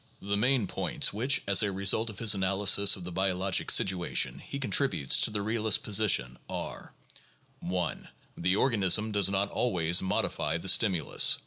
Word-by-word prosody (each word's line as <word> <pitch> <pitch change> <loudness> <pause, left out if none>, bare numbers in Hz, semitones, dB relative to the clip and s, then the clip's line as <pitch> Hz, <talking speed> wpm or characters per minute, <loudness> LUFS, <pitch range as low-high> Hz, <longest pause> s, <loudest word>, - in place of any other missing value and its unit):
The 100 +1 -3
main 125 +2 +1
points - - -2
which, 125 +7 0
as 100 -1 +3
a 105 -2 0
result 100 +4 0
of 105 - -10
his 110 -1 +3
analysis 100 +1 +2
of 95 - -10
the 90 - -7
biologic 95 +1 -1
situation, 90 -2 +1
he 140 - -8
contributes 125 - +2
to - - +2
the 105 -2 -4
realist 110 0 0
position 95 - +1
are: - - -7 0.7
1. 90 0 -4 0.3
The 90 +2 0
organism 105 -2 +1
does 100 -2 +2
not 100 +1 -2
always 85 -7 0
modify 80 -4 -2
the 95 +3 -2
stimulus. 90 -9 +2
100 Hz, 155 wpm, -28 LUFS, 90-110 Hz, 0.7 s, as